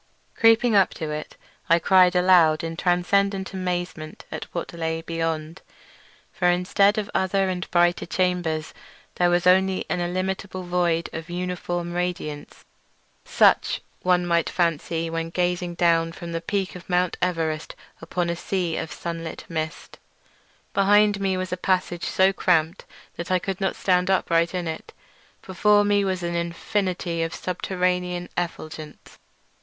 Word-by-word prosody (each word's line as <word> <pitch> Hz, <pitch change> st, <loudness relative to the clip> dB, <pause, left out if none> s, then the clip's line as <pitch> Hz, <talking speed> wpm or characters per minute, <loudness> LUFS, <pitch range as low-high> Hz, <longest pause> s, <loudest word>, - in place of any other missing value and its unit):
Creeping 225 Hz, 0 st, +4 dB
up 195 Hz, -2 st, +5 dB
to 155 Hz, -2 st, -4 dB
it, 150 Hz, 0 st, -6 dB, 0.3 s
I 170 Hz, -, +6 dB
cried 180 Hz, +1 st, +4 dB
aloud 180 Hz, -3 st, +5 dB
in 165 Hz, 0 st, -4 dB
transcendent 190 Hz, +3 st, +1 dB
amazement 175 Hz, -4 st, -4 dB
at -, -, -5 dB
what 170 Hz, -, -6 dB
lay 165 Hz, -1 st, -3 dB
beyond; 165 Hz, 0 st, -3 dB, 0.7 s
for 180 Hz, -, +1 dB
instead 195 Hz, +4 st, +3 dB
of 210 Hz, -2 st, -1 dB
other 190 Hz, 0 st, +1 dB
and 180 Hz, -1 st, -4 dB
brighter 175 Hz, 0 st, +2 dB
chambers 175 Hz, -4 st, -1 dB, 0.4 s
there 175 Hz, 0 st, +3 dB
was 175 Hz, 0 st, +1 dB
only 190 Hz, +1 st, +3 dB
an 180 Hz, -, 0 dB
illimitable 185 Hz, +1 st, -3 dB
void 175 Hz, -2 st, 0 dB
of 165 Hz, +1 st, -6 dB
uniform 175 Hz, -1 st, -3 dB
radiance, 175 Hz, -4 st, -4 dB, 0.6 s
such -, -, +3 dB
as -, -, -6 dB, 0.2 s
one 180 Hz, -1 st, +2 dB
might 170 Hz, -1 st, +1 dB
fancy 165 Hz, -1 st, -1 dB
when 165 Hz, 0 st, -3 dB
gazing 175 Hz, 0 st, -1 dB
down 165 Hz, -1 st, +2 dB
from 170 Hz, -1 st, -8 dB
the 165 Hz, 0 st, -3 dB
peak 195 Hz, 0 st, -2 dB
of 180 Hz, -, -11 dB
Mount 180 Hz, 0 st, +1 dB
Everest 165 Hz, -3 st, -1 dB, 0.3 s
upon 170 Hz, +2 st, -2 dB
a 170 Hz, -, -1 dB
sea 175 Hz, -1 st, -2 dB
of 160 Hz, -, -4 dB
sunlit 165 Hz, -1 st, -6 dB
mist. 160 Hz, -1 st, -5 dB, 0.7 s
Behind 205 Hz, +1 st, +4 dB
me 190 Hz, -1 st, 0 dB
was 185 Hz, 0 st, -3 dB
a -, -, -2 dB
passage 180 Hz, -2 st, -1 dB
so 190 Hz, +1 st, +3 dB
cramped 170 Hz, -1 st, +1 dB, 0.3 s
that 170 Hz, -, -5 dB
I 185 Hz, -, +3 dB
could 190 Hz, +1 st, -4 dB
not 190 Hz, -, 0 dB
stand 180 Hz, -1 st, +1 dB
upright 170 Hz, -2 st, +2 dB
in 175 Hz, -2 st, -2 dB
it; 160 Hz, -, -6 dB, 0.5 s
before 205 Hz, +2 st, +3 dB
me 205 Hz, 0 st, +3 dB
was 185 Hz, -2 st, -2 dB
an 170 Hz, 0 st, -2 dB
infinity 170 Hz, 0 st, -2 dB
of 165 Hz, 0 st, -2 dB
subterranean 180 Hz, -1 st, -2 dB
effulgence. 155 Hz, -3 st, -6 dB
175 Hz, 150 wpm, -24 LUFS, 165-185 Hz, 0.7 s, I